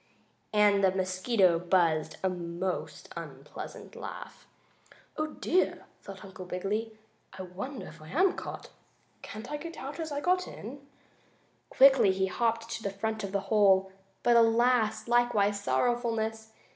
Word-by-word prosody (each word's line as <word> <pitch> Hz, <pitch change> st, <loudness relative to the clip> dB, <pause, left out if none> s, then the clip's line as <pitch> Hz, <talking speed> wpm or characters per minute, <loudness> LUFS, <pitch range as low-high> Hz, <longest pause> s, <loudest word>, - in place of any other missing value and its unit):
and 205 Hz, -2 st, +4 dB
the 190 Hz, -, +6 dB
mosquito 185 Hz, 0 st, +2 dB
buzzed 165 Hz, -3 st, +1 dB
a -, -, +3 dB
most 175 Hz, 0 st, -4 dB
unpleasant -, -, -9 dB
laugh. -, -, -9 dB, 0.7 s
"Oh, 310 Hz, 0 st, -1 dB
dear!" 360 Hz, +3 st, 0 dB, 0.2 s
thought 195 Hz, -1 st, -10 dB
Uncle 190 Hz, -1 st, -9 dB
Wiggily. 210 Hz, +5 st, -3 dB, 0.4 s
"I 190 Hz, -, -5 dB
wonder 200 Hz, +10 st, -6 dB
if -, -, -12 dB
I 155 Hz, -, -12 dB
am 370 Hz, +5 st, +3 dB
caught? -, -, -8 dB, 0.5 s
Can't 220 Hz, +5 st, -8 dB
I 295 Hz, -, -2 dB
get 335 Hz, +3 st, -8 dB
out 280 Hz, +5 st, -7 dB
as 320 Hz, -2 st, -4 dB
I 285 Hz, -, -2 dB
got 365 Hz, +4 st, +1 dB
in?" 275 Hz, +6 st, -9 dB, 0.8 s
Quickly 265 Hz, -7 st, +6 dB
he 190 Hz, 0 st, 0 dB
hopped 230 Hz, +4 st, -1 dB
to 235 Hz, -, -4 dB
the 200 Hz, -, -2 dB
front 215 Hz, +2 st, -3 dB
of 195 Hz, -, -4 dB
the 200 Hz, 0 st, 0 dB
hole. 195 Hz, -2 st, +5 dB, 0.3 s
But 240 Hz, -, +4 dB
alas! 230 Hz, -1 st, +3 dB
Likewise 225 Hz, -4 st, +2 dB
sorrowfulness! 225 Hz, -2 st, 0 dB
215 Hz, 145 wpm, -29 LUFS, 190-240 Hz, 0.8 s, the